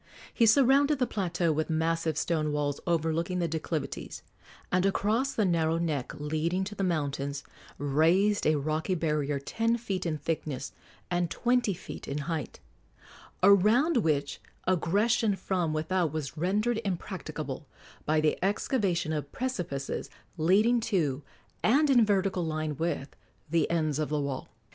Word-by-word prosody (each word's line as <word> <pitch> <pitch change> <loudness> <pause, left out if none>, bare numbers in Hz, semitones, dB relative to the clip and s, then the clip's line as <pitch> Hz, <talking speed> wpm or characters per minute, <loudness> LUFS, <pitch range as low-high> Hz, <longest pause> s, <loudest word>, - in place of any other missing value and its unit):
He 230 - +4
surrounded 280 +4 +5
the 255 - +2
plateau 175 -6 0
with 155 +2 -1
massive 160 -1 0
stone 155 -2 0
walls 145 -1 -1
overlooking 170 +2 0
the 175 -1 0
declivities, 160 -1 -4 0.5
and 180 0 +2
across 215 +7 +1
the 215 - +2
narrow 165 -2 +2
neck 155 -6 -2
leading 155 +5 -1
to 205 +2 -5
the 195 - -3
mountains 140 -4 -1 0.3
raised 165 +9 +2
a 155 - +4
rocky 155 +5 -1
barrier 150 -3 0
ten 225 +11 0
feet 195 -6 -3
in 155 -2 -1
thickness 150 -3 -3 0.4
and 175 -1 +1
twenty 245 -3 +1
feet - - -9
in 140 - -3
height, 160 -6 -4 0.8
around 215 - +5
which 150 -8 0 0.2
aggression 200 +5 +2
from 180 -3 -1
without 160 +1 0
was 155 -3 -4
rendered 210 +8 0
impracticable 185 -4 -5 0.4
by 155 +1 +2
the 155 +3 +1
excavation 195 - 0
of 145 -2 -4
precipices 180 - -3 0.3
leading 200 +9 +3
to, 165 - 0 0.4
and 285 +5 +4
in 240 -3 +6
vertical 195 -3 +1
line 155 -2 -2
with, 160 -2 -3 0.4
the 165 -2 +2
ends 155 -3 0
of 155 - -1
the 150 0 0
wall. 140 -2 -3
170 Hz, 140 wpm, -29 LUFS, 155-200 Hz, 0.8 s, in